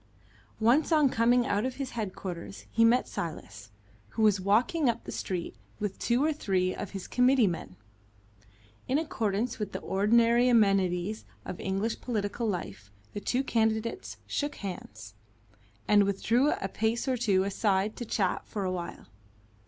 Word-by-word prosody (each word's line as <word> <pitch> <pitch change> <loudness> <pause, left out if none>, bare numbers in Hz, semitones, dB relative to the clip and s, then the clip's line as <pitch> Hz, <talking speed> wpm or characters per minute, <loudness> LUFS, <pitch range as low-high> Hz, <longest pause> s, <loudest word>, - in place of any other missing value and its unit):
Once 245 +9 +3
on 305 -4 +5
coming 240 +1 +3
out 205 +1 0
of 255 0 -2
his 270 -2 -4
headquarters 190 -4 -6
he 230 - +3
met 240 +2 +4
Silas, 105 - -6 0.4
who 220 - -2
was 205 -3 +4
walking 245 - +2
up 235 0 -2
the - - -7
street 175 -8 -4 0.2
with 205 -2 -3
two 245 +3 +1
or 315 - +2
three 185 -9 0
of 205 - -6
his 195 -2 -7
committee 250 -1 +4
men. 165 - -3 1.1
In 265 - +2
accordance 230 -7 -1
with 210 -2 -4
the 190 - -3
ordinary 235 +5 +3
amenities 195 -3 +2 0.2
of 180 - -6
English 195 +4 -2
political 225 -1 -2
life, 105 - -4 0.2
the - - -3
two 250 +6 0
candidates 225 - -1
shook 290 0 -2
hands, 110 - -8 0.7
and 205 -1 +6
withdrew 230 +7 +2
a 195 - -2
pace 225 +5 -1
or 260 - +2
two 205 -6 +2
aside 200 +1 0
to - - -4
chat 200 -5 -1
for 205 - -4
a 185 - -1
while. 175 -2 -6
215 Hz, 155 wpm, -29 LUFS, 190-240 Hz, 1.1 s, and